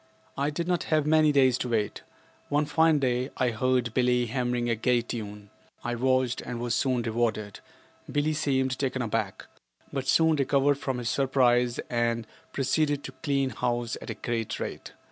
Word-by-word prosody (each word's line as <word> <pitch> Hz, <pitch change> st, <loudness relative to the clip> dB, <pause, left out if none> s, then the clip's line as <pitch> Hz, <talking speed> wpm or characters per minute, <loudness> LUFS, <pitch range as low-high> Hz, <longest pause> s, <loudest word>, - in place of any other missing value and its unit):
I 140 Hz, +2 st, 0 dB
did 170 Hz, +3 st, -3 dB
not 180 Hz, -1 st, 0 dB
have 155 Hz, -2 st, +1 dB
many 155 Hz, 0 st, +4 dB
days 130 Hz, -3 st, +4 dB
to 125 Hz, -, -2 dB
wait. 110 Hz, -3 st, -1 dB, 0.5 s
One 145 Hz, +1 st, +2 dB
fine 160 Hz, +1 st, +3 dB
day 130 Hz, -1 st, 0 dB
I 125 Hz, -2 st, +2 dB
heard 125 Hz, 0 st, 0 dB
Billie 125 Hz, 0 st, +2 dB
hammering 120 Hz, 0 st, -1 dB
a 120 Hz, -, +2 dB
gay 120 Hz, +2 st, +2 dB
tune. 105 Hz, -3 st, -7 dB, 0.3 s
I 120 Hz, -, -2 dB
watched 130 Hz, 0 st, +1 dB
and 120 Hz, -1 st, -5 dB
was 120 Hz, -1 st, -1 dB
soon 130 Hz, -2 st, +1 dB
rewarded. 110 Hz, -3 st, -1 dB, 0.5 s
Billie 145 Hz, +2 st, +1 dB
seemed 130 Hz, -3 st, 0 dB
taken 130 Hz, -2 st, -1 dB
aback, 110 Hz, -3 st, -2 dB, 0.5 s
but 135 Hz, -2 st, -3 dB
soon 160 Hz, +1 st, +4 dB
recovered 140 Hz, 0 st, +2 dB
from 130 Hz, -3 st, -2 dB
his 120 Hz, -2 st, -2 dB
surprise 125 Hz, -3 st, +2 dB
and 120 Hz, -1 st, 0 dB, 0.3 s
proceeded 145 Hz, +2 st, 0 dB
to -, -, -6 dB
clean 140 Hz, -3 st, 0 dB
house 120 Hz, -2 st, -1 dB
at -, -, -8 dB
a -, -, -3 dB
great 115 Hz, -2 st, -3 dB
rate. -, -, -6 dB
125 Hz, 170 wpm, -27 LUFS, 120-140 Hz, 0.5 s, many